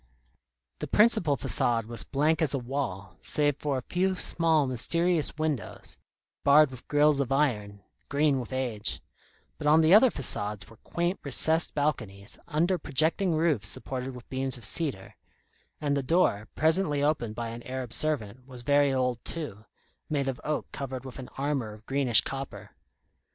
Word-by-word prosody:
The - - -4
principal 210 -10 +3
façade 120 -2 +1
was 115 -3 -2
blank 150 - 0
as 150 -3 +1
a - - 0
wall, 120 -7 -5
save 145 -2 0
for 145 -3 -2
a 130 - -5
few 185 +5 0
small, 165 -4 +2
mysterious 160 +7 0
windows, 155 -4 -4 0.4
barred 145 0 +6
with 130 -1 -12
grilles 150 -1 +3
of 135 -2 -1
iron, 105 -8 0 0.3
green 140 -1 +2
with 125 - -7
age; 125 -5 -3 0.6
but 150 - -2
on 155 +2 +6
the 160 +3 +4
other 225 +5 +7
façades 105 - +1
were 115 - -17
quaint 175 +2 -2
recessed 160 +4 +3
balconies, 110 -10 -2
under 170 +4 0
projecting 160 +5 +1
roofs 155 -10 +1
supported 130 +2 -4
with 125 - -12
beams 130 0 -3
of 120 - -3
cedar; 110 - -2 0.6
and 145 -1 0
the 140 - 0
door, 130 - +1
presently 155 -2 +2
opened 120 -8 0
by 115 0 -4
an 115 +1 -8
Arab 130 -1 -6
servant, 130 -5 -1
was 125 -2 -10
very 145 +1 +3
old 125 -3 -1
too, 125 -11 -5 0.4
made 140 -3 -1
of 130 -2 -4
oak 150 0 -2
covered 135 -1 -6
with 130 0 -9
an 130 - -8
armour 135 -6 -2
of 105 +1 -16
greenish 135 -4 +4
copper. 135 0 -7
135 Hz, 160 wpm, -28 LUFS, 120-155 Hz, 0.6 s, other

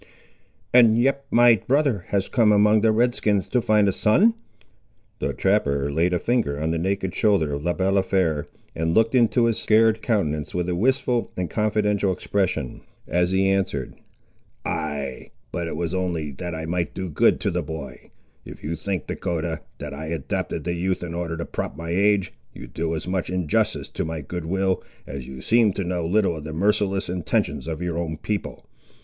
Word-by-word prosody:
"And 115 -3 +7
yet 135 +3 +1
my 120 -1 +6
brother 135 - +2
has 100 -1 0
come 115 -3 +3
among 105 +1 +5
the 110 0 +4
Red 120 +3 +2
skins 105 -4 0
to 125 - +2
find 105 -2 +3
a 95 - +2
son?" 195 - +4 0.9
The - - -1
trapper 70 -8 +1
laid 85 +5 +1
a 90 - +2
finger 110 -9 0
on 80 +2 -1
the 85 - -1
naked 95 +1 -1
shoulder 100 -9 +2
of 70 +1 -4
Le 85 +1 0
Balafré, 95 -5 +1 0.3
and 80 +1 0
looked 115 +1 +3
into 120 -1 +4
his 115 -2 +1
scarred 110 0 +3
countenance 75 - -1
with 90 -1 -1
a 90 - 0
wistful 125 +3 +1
and 90 -3 -2
confidential 105 -2 +1
expression, 95 -8 -2 0.3
as 90 0 +1
he 95 +1 +2
answered— 95 -9 0 0.7
"Ay; 70 -4 -3 0.2
but 85 -1 -3
it 80 - -4
was 85 +1 -2
only 85 -5 -2
that 85 +5 -5
I 80 0 -4
might 85 +1 -2
do 95 -1 -3
good 80 - +3
to - - 0
the 90 - -1
boy. 75 -5 -8 0.3
If - - -11
you 80 +3 -2
think, 90 -2 -3
Dahcotah, 80 -2 -3 0.2
that - - -6
I 80 +3 -6
adopted 80 -4 -3
the 85 - -1
youth 90 +2 -1
in 85 -1 -5
order 85 -1 -3
to 85 - -4
prop - - -5
my 85 +1 -5
age, 100 +1 +2 0.2
you - - -8
do 80 +7 -3
as 80 - -5
much 90 -1 -1
injustice 90 -4 0
to - - -3
my 80 -1 -4
goodwill, 90 +5 -1 0.2
as 70 -2 -7
you 65 -1 -8
seem 110 - +3
to 100 - -2
know 90 -2 -2
little 95 -1 +2
of 75 - -8
the 80 0 -6
merciless 100 +2 +1
intentions 80 -5 -1
of 80 +1 -4
your 85 -1 -2
own 80 -2 -3
people. 105 +5 -4
90 Hz, 190 wpm, -24 LUFS, 80-105 Hz, 0.9 s, And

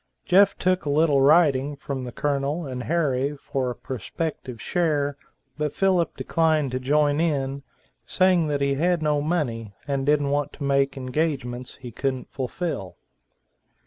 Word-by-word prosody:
Jeff 195 +2 +5
took 185 0 +1
a 145 - -3
little 145 -1 +3
writing 145 -2 +4
from 140 -2 -5
the 125 - -6
Colonel 145 +4 -1
and 130 -2 -5
Harry 145 -4 0
for 135 -2 -2
a 120 - -4
prospective 130 - -5
share 150 -5 0 0.4
but 150 -1 -1
Philip 185 -3 +1
declined 155 -4 +1
to 130 - -2
join 145 +2 +2
in, 140 -4 -1 0.4
saying 185 -3 +2
that 145 -1 -1
he 140 0 +2
had 170 +3 +1
no 150 -1 +2
money, 120 - -2
and 140 -1 -1
didn't 145 0 +2
want 145 0 -1
to - - -8
make 140 0 +1
engagements 130 -2 -2
he 125 -3 -9
couldn't 130 +2 -3
fulfill. 130 - -4
145 Hz, 150 wpm, -24 LUFS, 135-155 Hz, 0.4 s, Jeff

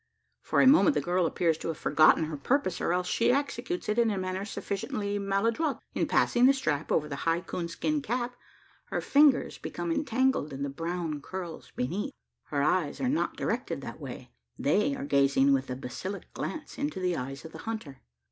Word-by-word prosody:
For - - +2
a - - +6
moment 290 +1 +6
the - - +3
girl 175 0 +1
appears 165 -1 +1
to - - -5
have 165 -2 -2
forgotten 155 +2 +5
her 155 0 -3
purpose, 185 - 0
or - - +1
else 180 +1 +1
she 230 - +2
executes 285 +6 -2
it 210 +2 +1
in 230 -1 +4
a 205 - -1
manner 185 +1 -2
sufficiently 205 0 -3
maladroit. 225 +10 0 0.2
In - - 0
passing 245 +1 +4
the 275 - +6
strap 155 - -1
over 150 - +2
the 140 -2 -5
high 165 +1 +1
coon 175 -1 -4
skin 295 - -1
cap, 245 0 -2 0.5
her - - -2
fingers 285 -2 +4
become 340 - -4
entangled 260 - +1
in 135 +1 -4
the 140 - -2
brown 165 0 -3
curls 180 0 -7
beneath. 195 - -2 0.3
Her 140 -2 -1
eyes 155 -2 +1
are 255 - 0
not 295 - 0
directed - - -2
that - - -8
way: - - -8 0.3
they 275 +7 +2
are 270 +1 -5
gazing 140 - +4
with 135 -1 0
a 125 - -2
basilisk 180 +10 -6
glance 315 - -5
into 290 -7 -2
the 180 -1 0
eyes 135 +3 -5
of 160 - -8
the - - -10
hunter. 160 -12 -6
185 Hz, 195 wpm, -29 LUFS, 155-255 Hz, 0.5 s, a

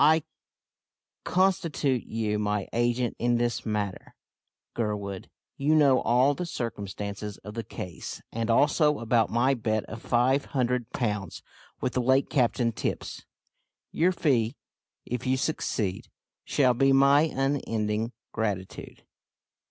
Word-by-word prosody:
I 160 0 +5 1.0
constitute 170 -9 +1
you 110 -2 -1
my 105 -2 -1
agent 120 0 +1
in 120 0 +2
this 120 -1 -1
matter, 105 -3 -3 0.6
Gurwood. 100 -4 -3 0.3
You 150 +3 +2
know 140 -4 +5
all 125 +4 +3
the 175 +4 -4
circumstances 105 - -5
of 105 +1 -8
the 115 0 -4
case, 90 -4 -7
and 115 0 -2
also 150 +5 +3
about 115 -1 +2
my 125 +4 +2
bet 110 -3 -1
of 110 +1 -8
five 130 +3 +2
hundred 125 -2 -1
pounds 105 -6 -3 0.4
with 125 - -1
the 125 - +1
late 130 +3 +2
Captain 120 -2 +2
Tipps. - - -4 0.6
Your 175 +3 +3
fee, 130 -8 +1 0.5
if 125 +1 -4
you 130 +1 +2
succeed, 110 -9 -2 0.4
shall 130 -3 +3
be 135 +3 +3
my 140 +2 +6
unending 115 -5 -1 0.2
gratitude. 100 -4 -4
120 Hz, 125 wpm, -27 LUFS, 110-135 Hz, 1.0 s, my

